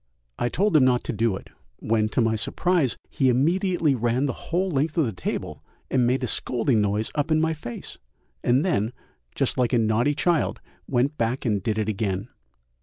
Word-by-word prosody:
I 120 Hz, -, +1 dB
told 200 Hz, +4 st, +1 dB
him 150 Hz, -, +7 dB
not 125 Hz, -1 st, +3 dB
to -, -, -3 dB
do 110 Hz, -2 st, +1 dB
it, -, -, -10 dB, 0.3 s
when, 110 Hz, -1 st, 0 dB
to 125 Hz, -, +1 dB
my 115 Hz, -1 st, +2 dB
surprise, 155 Hz, -, 0 dB
he 135 Hz, -2 st, +1 dB
immediately 165 Hz, -, +2 dB
ran 120 Hz, +2 st, 0 dB
the 135 Hz, -, -1 dB, 0.2 s
whole 185 Hz, +3 st, 0 dB
length 150 Hz, +3 st, 0 dB
of 160 Hz, -, +4 dB
the 110 Hz, -, -3 dB
table 85 Hz, -, -4 dB, 0.3 s
and 125 Hz, -2 st, +3 dB
made 130 Hz, +2 st, +1 dB
a -, -, 0 dB
scolding 120 Hz, +1 st, +1 dB
noise 105 Hz, +2 st, 0 dB
up 145 Hz, +1 st, -1 dB
in 155 Hz, 0 st, +3 dB
my 160 Hz, 0 st, +1 dB
face, 120 Hz, -6 st, -7 dB, 0.4 s
and 125 Hz, +6 st, +3 dB
then, 120 Hz, -, 0 dB, 0.4 s
just -, -, 0 dB
like 125 Hz, 0 st, +1 dB
a -, -, +5 dB
naughty 115 Hz, +5 st, +2 dB
child, 170 Hz, 0 st, +1 dB, 0.3 s
went 135 Hz, +3 st, 0 dB
back 115 Hz, +4 st, -1 dB
and 105 Hz, -4 st, +1 dB
did 110 Hz, +2 st, -1 dB
it 110 Hz, -1 st, 0 dB
again. 100 Hz, 0 st, -2 dB
125 Hz, 195 wpm, -25 LUFS, 110-150 Hz, 0.4 s, him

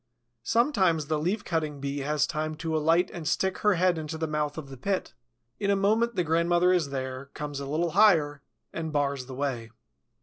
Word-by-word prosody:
Sometimes 190 Hz, -, +2 dB
the 155 Hz, +1 st, -1 dB
Leaf 190 Hz, +7 st, -1 dB
cutting 155 Hz, -3 st, -2 dB
Bee 140 Hz, +1 st, -3 dB
has 150 Hz, +1 st, +1 dB
time 155 Hz, -1 st, -3 dB
to 160 Hz, 0 st, -3 dB
alight 165 Hz, +4 st, +2 dB
and 165 Hz, -3 st, -5 dB
stick 190 Hz, +3 st, 0 dB
her 210 Hz, -2 st, +3 dB
head 180 Hz, -1 st, +2 dB
into 155 Hz, +1 st, -5 dB
the 160 Hz, -, -1 dB
mouth 150 Hz, -1 st, -2 dB
of 145 Hz, -3 st, -7 dB
the 135 Hz, -, -8 dB
pit. 185 Hz, -, -2 dB, 0.5 s
In 200 Hz, -, 0 dB
a 200 Hz, -, +4 dB
moment 220 Hz, +4 st, +2 dB
the 180 Hz, -, +1 dB
grandmother 170 Hz, +2 st, +3 dB
is 170 Hz, -6 st, +1 dB
there, 130 Hz, 0 st, -4 dB
comes 145 Hz, -1 st, -5 dB
a 140 Hz, -, -5 dB
little 165 Hz, +3 st, 0 dB
higher, 160 Hz, -8 st, +4 dB, 0.3 s
and 160 Hz, -1 st, -4 dB
bars 140 Hz, -3 st, -1 dB
the 130 Hz, -, -7 dB
way. 130 Hz, -4 st, -3 dB
160 Hz, 200 wpm, -27 LUFS, 145-180 Hz, 0.5 s, a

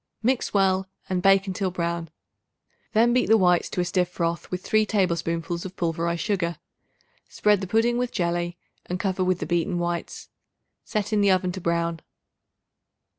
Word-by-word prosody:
Mix 250 Hz, +2 st, +1 dB
well 190 Hz, -1 st, +2 dB, 0.2 s
and 185 Hz, -1 st, 0 dB
bake 195 Hz, +1 st, +5 dB
until 190 Hz, 0 st, -2 dB
brown; 170 Hz, -2 st, -3 dB, 0.8 s
then 235 Hz, +2 st, +4 dB
beat 250 Hz, -, +2 dB
the 225 Hz, -, +6 dB
whites 180 Hz, -3 st, +3 dB
to 180 Hz, -, -1 dB
a -, -, 0 dB
stiff 180 Hz, 0 st, 0 dB
froth 170 Hz, -1 st, -2 dB
with 180 Hz, 0 st, -4 dB
3 215 Hz, 0 st, +3 dB
tablespoonfuls 170 Hz, -4 st, -1 dB
of 190 Hz, 0 st, -8 dB
pulverized 170 Hz, -1 st, -1 dB
sugar. 175 Hz, -6 st, -1 dB, 0.7 s
Spread 210 Hz, -2 st, +2 dB
the 190 Hz, -, -4 dB
pudding 230 Hz, +4 st, +2 dB
with 250 Hz, -1 st, -1 dB
jelly 175 Hz, -1 st, -1 dB, 0.3 s
and 180 Hz, +1 st, -3 dB
cover 190 Hz, -1 st, 0 dB
with 185 Hz, -1 st, +1 dB
the -, -, -4 dB
beaten 175 Hz, +1 st, 0 dB
whites; 175 Hz, 0 st, -3 dB, 0.5 s
set 215 Hz, 0 st, -2 dB
in 210 Hz, -, +3 dB
the 200 Hz, -, +4 dB
oven 185 Hz, -1 st, +2 dB
to 185 Hz, -, -7 dB
brown. 170 Hz, -1 st, 0 dB
185 Hz, 170 wpm, -25 LUFS, 170-200 Hz, 0.8 s, the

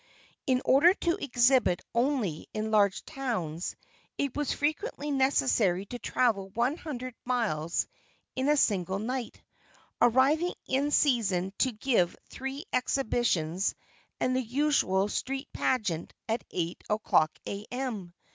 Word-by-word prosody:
In 255 Hz, -1 st, +2 dB
order 335 Hz, +8 st, +6 dB
to 340 Hz, -4 st, 0 dB
exhibit 245 Hz, -7 st, +3 dB
only 235 Hz, -, 0 dB
in 215 Hz, 0 st, -2 dB
large 200 Hz, -2 st, +3 dB
towns, 180 Hz, -, -3 dB, 0.4 s
it 280 Hz, -3 st, -1 dB
was 295 Hz, -2 st, -1 dB
frequently 300 Hz, 0 st, -2 dB
necessary 200 Hz, -, +2 dB
to 245 Hz, +4 st, -7 dB
travel 210 Hz, -8 st, +1 dB
one 235 Hz, +7 st, 0 dB
hundred 255 Hz, -7 st, -6 dB
miles 205 Hz, -11 st, 0 dB, 0.5 s
in 265 Hz, +2 st, 0 dB
a 300 Hz, -, +4 dB
single 190 Hz, -6 st, +1 dB
night, 240 Hz, +3 st, -4 dB, 0.6 s
arriving 275 Hz, +9 st, +4 dB
in 275 Hz, +2 st, +1 dB
season 205 Hz, -11 st, +2 dB
to 260 Hz, -, +3 dB
give 215 Hz, -6 st, +1 dB, 0.2 s
three 270 Hz, +5 st, -5 dB
exhibitions 220 Hz, -, +1 dB, 0.4 s
and 255 Hz, -, +1 dB
the 260 Hz, -, +2 dB
usual 245 Hz, -7 st, +2 dB
street 270 Hz, +6 st, -3 dB
pageant 195 Hz, -10 st, -1 dB
at 225 Hz, +1 st, -1 dB
8 170 Hz, -1 st, -3 dB
o'clock 210 Hz, -7 st, +2 dB
A.M. 210 Hz, -3 st, -5 dB
245 Hz, 120 wpm, -29 LUFS, 195-270 Hz, 0.6 s, order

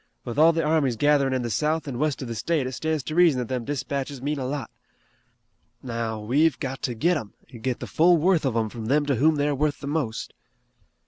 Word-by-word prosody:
With 120 Hz, +4 st, -3 dB
all 160 Hz, +2 st, +7 dB
the 165 Hz, 0 st, -1 dB
armies 150 Hz, -5 st, +2 dB
gatherin' 145 Hz, +1 st, +3 dB
in 130 Hz, -1 st, -1 dB
the 120 Hz, -, -3 dB
south 155 Hz, +8 st, 0 dB
an' 125 Hz, -3 st, -4 dB
west 150 Hz, -2 st, -1 dB
of -, -, -6 dB
the 115 Hz, -, -4 dB
state 145 Hz, +5 st, -1 dB
it 130 Hz, -, -3 dB
stands 155 Hz, +3 st, -2 dB
to 155 Hz, -, -5 dB
reason 170 Hz, -5 st, +5 dB
that 125 Hz, -2 st, -3 dB
them 125 Hz, -3 st, -2 dB
dispatches 140 Hz, 0 st, -3 dB
mean 145 Hz, +3 st, -2 dB
a 130 Hz, -, -3 dB
lot. 135 Hz, -4 st, -4 dB, 1.1 s
Now, 115 Hz, -3 st, -3 dB
we've 140 Hz, +8 st, +2 dB
got 135 Hz, 0 st, -4 dB
to 120 Hz, -, -2 dB
get 170 Hz, +9 st, +2 dB
'em 110 Hz, -8 st, -8 dB, 0.2 s
an' 120 Hz, -, -9 dB
get 125 Hz, +1 st, -2 dB
the -, -, -5 dB
full 175 Hz, +2 st, +4 dB
worth 170 Hz, +1 st, +2 dB
of 130 Hz, -5 st, 0 dB
'em 110 Hz, -1 st, 0 dB
from 115 Hz, 0 st, -7 dB
them 145 Hz, +4 st, +2 dB
to 140 Hz, -2 st, +1 dB
whom 155 Hz, +5 st, +4 dB
they're 145 Hz, 0 st, +1 dB
worth 145 Hz, +1 st, 0 dB
the -, -, -8 dB
most." 140 Hz, -6 st, -3 dB
140 Hz, 240 wpm, -25 LUFS, 125-155 Hz, 1.1 s, all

